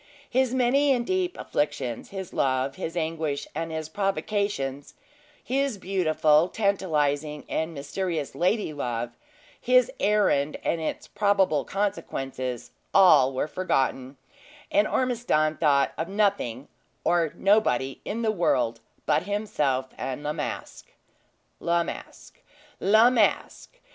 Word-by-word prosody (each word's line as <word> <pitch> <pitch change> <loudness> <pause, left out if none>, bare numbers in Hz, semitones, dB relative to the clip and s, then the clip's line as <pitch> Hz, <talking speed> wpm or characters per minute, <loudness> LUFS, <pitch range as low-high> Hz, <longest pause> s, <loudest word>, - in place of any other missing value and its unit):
His 260 -1 +1
many 260 +3 +3
and 240 -2 -1
deep 370 +1 -1
afflictions, 140 -5 -2
his 190 -2 -7
love, 130 0 0
his 170 +1 -5
anguish, 160 -3 -2
and 165 0 -4
his 160 -1 -4
provocations; 195 -6 -2 0.5
his 270 -3 0
beautiful, 165 -4 +2
tantalizing, 150 -8 0
and 160 +1 -2
mysterious 155 +1 -3
lady 180 -1 0
love; 120 -4 -3 0.5
his 250 0 +4
errand 200 -9 +2
and 165 - 0
its 160 - -4
probable 195 -8 +2
consequences, 135 - -3 0.2
all 155 -9 +7
were 130 +3 -2
forgotten; 135 -6 -1 0.5
and 305 +1 +3
Ormiston 225 -12 +1
thought 140 -3 +3
of 165 +2 -2
nothing 195 - 0 0.4
or 170 -3 +2
nobody 160 - +2
in 230 +3 -3
the 220 - +2
world 125 - +1 0.3
but - - +1
himself 145 -11 -1
and 135 +2 -4
La 150 +1 -1
Masque. 150 -2 -6 0.7
La 170 0 +1
Masque! - - -9 0.4
La 220 +5 +5
Masque! 240 - 0
165 Hz, 120 wpm, -26 LUFS, 140-205 Hz, 0.7 s, all